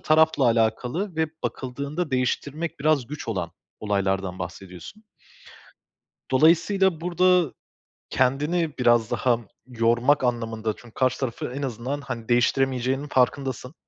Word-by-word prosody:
tarafla 160 -2 +3
alakalı 120 - 0
ve 160 0 +2 0.2
bakıldığında 140 +5 -4
değiştirmek 140 +5 -2
biraz 150 -4 +2
güç 150 0 -7
olan 90 -6 -2 0.3
olaylardan 95 -3 -1
bahsediyorsun. 90 - -9 1.3
Dolayısıyla 165 +5 +3
burada 180 -2 +3 0.6
kendini 150 +5 0
biraz 120 -3 +3
daha 120 -2 +2 0.3
yormak 120 +3 +2
anlamında 115 -3 -1
çünkü 120 -2 -16
karşı 130 -1 +1
tarafı 125 -1 -4
en 140 - -4
azından, 130 +2 -3
hani, 115 -3 -6
değiştiremeyeceğinin 130 +2 +1
farkındasın 130 0 0
130 Hz, 110 wpm, -24 LUFS, 115-155 Hz, 1.3 s, tarafla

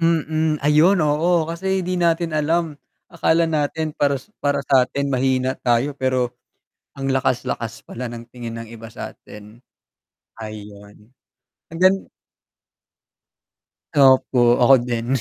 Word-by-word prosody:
Mm, 160 -1 +1
ayun 155 +6 +5
oo. 160 +3 +2
Kasi 185 +3 -2
'di 180 0 -2
natin 170 -1 +1
alam, 155 0 0 0.3
akala 170 0 +2
natin 155 0 -1
para 140 -1 +1 0.2
para 140 -1 0
satin 140 +1 +1
mahina 130 0 +1
tayo, 120 +4 +1
pero 130 -2 -1 0.7
ang 135 - -3
lakas-lakas 125 -4 -2
pala 125 0 -6
ng 115 0 -9
tingin 120 -1 -8
ng 115 - -7
iba 115 -1 -11
satin, 105 +1 -11 0.8
ayun. 105 0 -11 0.6
Ang 165 - -7
gan 185 +1 +5 2.0
Opo 130 -4 +4
ako 135 +3 +7
din. 120 -1 -3
140 Hz, 115 wpm, -21 LUFS, 120-160 Hz, 2.0 s, ako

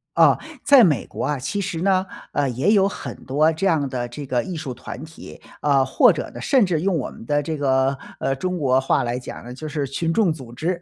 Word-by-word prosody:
啊， - - +6 0.3
在 280 -4 +7
美 150 - +2
国 - - -6
啊， 150 -1 0
其 200 +10 -2
实 165 -3 -3
呢， 190 0 +2 0.3
呃， 140 -2 +1
也 130 - +1
有 195 -1 +4
很 - - -7
多 150 +4 +3
这 165 +5 -1
样 155 -6 +2
的 125 -2 -3
这 130 +4 -8
个 125 -2 0
艺 185 - -5
术 135 -5 -5
团 - - -8
体， 160 +1 -12 0.2
啊， 140 -2 +3
或 - - +5
者 - - -4
呢 - - -9
甚 260 -6 +3
至 170 -4 0
用 185 -2 +1
我 130 - -3
们 - - -12
的 145 +3 +1
这 155 +1 -3
个， 135 -1 +1 0.2
呃， 135 0 0
中 185 +5 -3
国 135 -4 +2
话 135 - +1
来 120 0 -2
讲 125 - -9
呢， 125 - -8
就 155 +5 -7
是 150 -2 -2
群 165 +5 -2
众 190 -4 +3
组 130 -6 -11
织。 170 +8 -2
150 Hz, 260 characters per minute, -22 LUFS, 130-175 Hz, 0.3 s, 在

